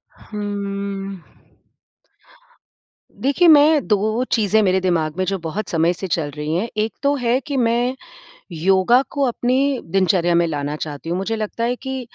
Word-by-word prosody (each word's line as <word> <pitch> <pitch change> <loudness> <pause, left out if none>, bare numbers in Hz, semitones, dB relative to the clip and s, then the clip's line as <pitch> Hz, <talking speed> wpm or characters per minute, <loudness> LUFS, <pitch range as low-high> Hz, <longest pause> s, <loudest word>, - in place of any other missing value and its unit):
हम्म। 200 -2 -5 2.0
देखिए, 285 +6 +3
मैं 300 -2 +6
2 215 +3 +1
चीज़ें 220 -1 +3
मेरे 190 -1 +2
दिमाग 165 -3 0
में 185 - 0
जो 195 0 -1
बहुत 170 +6 -5
समय 165 +1 +2
से 190 +2 -6
चल 160 -4 -1
रही 150 +1 -3
हैं। 210 +7 -1 0.2
एक 220 - -4
तो 285 +1 +3
है 245 -1 +1
कि 285 -2 -2
मैं 240 +1 +1 0.6
योगा 190 +8 +3
को 285 - -1
अपने 245 +1 0 0.4
दिनचर्या 185 -3 +2
में 170 - +3
लाना 145 -1 -3
चाहती 150 +1 -6
हूँ। 175 - -1
मुझे 210 +4 -2
लगता 220 +1 -4
है 245 +1 0
कि 265 0 -5
200 Hz, 160 wpm, -20 LUFS, 175-240 Hz, 2.0 s, मैं